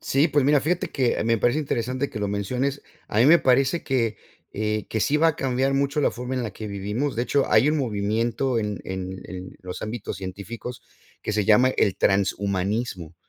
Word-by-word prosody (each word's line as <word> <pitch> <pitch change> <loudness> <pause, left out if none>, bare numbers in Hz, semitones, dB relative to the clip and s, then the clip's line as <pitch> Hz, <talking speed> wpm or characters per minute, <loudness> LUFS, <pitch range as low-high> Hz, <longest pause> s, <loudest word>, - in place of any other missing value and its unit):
Sí, 140 +5 +2
pues 145 -2 +2
mira, 145 0 +4
fíjate 175 +3 -1
que 130 -4 +1
me 115 0 +2
parece 120 +7 +2
interesante 130 -1 -1
que 115 -6 -6
lo 100 - -1
menciones. 125 +8 -2 0.3
A 105 - -1
mí 120 - +6
me 170 +3 +8
parece 135 +6 +3
que 115 -5 0 0.4
eh, 105 0 -2
que 110 - -2
sí 145 - +2
va 165 +1 +5
a 155 - -1
cambiar 135 +1 0
mucho 140 +2 +1
la - - +3
forma 125 +1 -5
en 125 - -1
la 110 - -5
que 110 +1 -7
vivimos. 105 +8 -2
De 120 - +1
hecho, 140 +2 +1
hay 140 - +5
un 155 - +2
movimiento 115 +2 0
en 105 -2 -3
en 95 0 -5
en 95 0 -8
los 90 -1 -7
ámbitos 110 -3 -5
científicos 100 +6 -7 0.4
que - - -3
se 105 -1 +1
llama 125 +6 +5
el 100 -7 +1
transhumanismo. 100 -2 0
115 Hz, 205 wpm, -24 LUFS, 100-135 Hz, 0.4 s, me